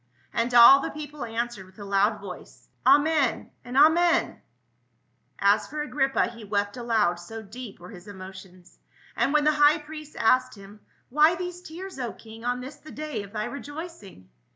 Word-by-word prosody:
And 235 +1 0
all 240 +4 +10
the - - -3
people 295 -2 -8
answered 230 -4 -4
with 185 - -21
a 205 - -9
loud 200 +2 +1
voice, 195 -3 -11 0.2
"Amen, 290 -1 +3
and 245 +2 -5
Amen 330 +4 +4 0.5
!" - - -45 0.2
As 210 0 -4
for 300 +1 -4
Agrippa, 270 -2 +1
he 230 -1 -12
wept 205 0 -2
aloud 225 -8 0
so 220 +6 -9
deep 220 +1 -10
were 180 +4 -12
his 180 -1 -13
emotions; 185 -2 -12 0.4
and - - +1
when 300 0 +3
the 305 - +4
high 295 0 +5
priest 305 0 -10
asked 255 +2 +2
him, 200 +1 -14 0.2
" - - -40
Why 305 +5 +5
these 355 0 -6
tears, 360 0 -9
O 240 -3 -3
king, 225 0 -13
on 245 +1 -1
this 270 +4 -9
the 310 - -15
day 300 -8 -5
of 200 0 -11
thy 210 -1 -2
re 280 - -6
joicing?" 290 - -9
245 Hz, 185 wpm, -26 LUFS, 205-300 Hz, 0.5 s, all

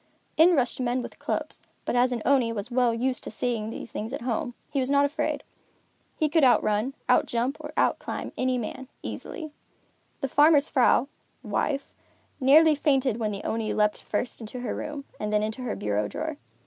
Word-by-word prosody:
In 340 +2 +6
rushed 255 -3 0
men 250 0 0
with - - -9
clubs, - - -3 0.3
but - - -1
as 250 +1 +4
an 235 -3 -2
Oni 255 -4 +3
was 225 +2 -5
well 245 -1 +3
used 250 +3 -1
to - - -5
seeing 230 -3 -2
these 225 - -8 0.2
at 275 - -5
home, 245 0 -2 0.2
he 280 - +1
was 260 0 -1
not 280 0 +4
afraid. 285 - -2 0.7
He 310 - +2
could 310 0 +2
outrun, 240 0 +3
outjump, 250 +2 +2
or - - -7
outclimb - - -1
any 255 0 0
man, 250 +3 -5 0.2
easily. 310 -3 -6 0.7
The 275 - 0
farmer's 295 +2 +5
vrouw 255 -1 +4 0.4
(wife) 280 -2 -2 0.5
nearly 305 +4 +6
fainted 270 -5 +1
when 220 -3 -1
the 200 -1 -5
Oni 220 -1 -1
leaped 210 0 +1
first 240 +3 -3
into 235 +3 -7
her 245 - -2
room 295 -2 -5 0.2
and 210 0 -2
then 210 0 +2
into 220 +4 -3
her 250 - -3
bureau 105 0 -1
drawer. - - -4
250 Hz, 180 wpm, -26 LUFS, 225-275 Hz, 0.7 s, In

